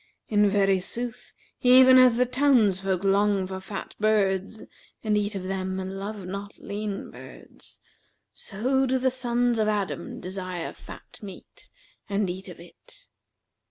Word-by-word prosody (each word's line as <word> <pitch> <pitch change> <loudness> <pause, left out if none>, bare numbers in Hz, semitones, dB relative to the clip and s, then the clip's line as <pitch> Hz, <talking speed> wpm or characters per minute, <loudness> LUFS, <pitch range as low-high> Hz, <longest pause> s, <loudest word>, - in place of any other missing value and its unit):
In 210 -1 +3
very 195 -1 +2
sooth 240 +6 -4 0.3
even 255 0 +7
as 250 -2 +6
the 250 - +3
townsfolk 210 -9 +2
long 200 0 +2
for 190 0 -6
fat 195 +1 -7
birds 210 -1 0 0.4
and 215 -1 +1
eat 205 0 -1
of 190 - -4
them 190 0 -3
and 190 +1 -5
love 200 -1 -6
not 200 +2 -7
lean 205 0 -5
birds, - - -14 0.5
so 260 +6 -1
do 260 +1 +1
the 260 0 +1
sons 245 -2 0
of 215 - +2
Adam 205 -2 -3
desire 185 -2 -5
fat - - -13
meat 195 -3 -12 0.4
and 200 -2 0
eat 190 +1 -8
of 175 - -11
it. 170 0 -16
205 Hz, 145 wpm, -26 LUFS, 190-235 Hz, 0.5 s, even